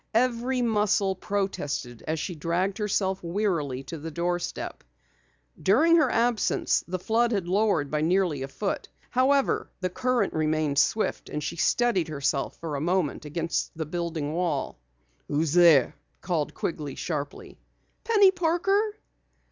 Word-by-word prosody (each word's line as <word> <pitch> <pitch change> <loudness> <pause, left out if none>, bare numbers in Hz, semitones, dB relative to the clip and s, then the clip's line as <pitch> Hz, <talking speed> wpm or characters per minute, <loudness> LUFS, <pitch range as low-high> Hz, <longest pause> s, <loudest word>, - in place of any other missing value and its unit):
Every 250 +1 +1
muscle 210 -3 +2
protested 145 - -3
as 160 0 -1
she 180 - -3
dragged 175 +6 -1
herself 195 -2 0
wearily 170 -8 -1
to 165 +3 -7
the 160 +3 -6
doorstep. 175 +2 -3 0.8
During 310 - +5
her 315 - +4
absence 235 -1 +1
the 185 +1 -2
flood 230 +6 +1
had 195 -6 -1
lowered 195 -6 +1
by 150 0 0
nearly 170 -3 +1
a 135 - -3
foot. 195 +9 -3 0.2
However, 270 +2 +2
the 185 -1 -2
current 255 +4 0
remained 155 -2 +1
swift, 215 - 0
and 150 - -4
she - - -3
steadied 195 -1 +2
herself 140 -2 -2
for 160 -3 -5
a 140 - -3
moment 170 -3 0
against 165 +2 -2
the 160 - -2
building 160 -2 -3
wall. 165 - -2 0.5
"Who's 150 +1 0
there?" 170 -7 +6 0.3
called 165 -5 -2
Quigley 150 -4 -4
sharply. 145 -4 -5 0.4
"Penny 410 -4 +5
Parker." 385 +4 +1
175 Hz, 140 wpm, -26 LUFS, 155-220 Hz, 0.8 s, there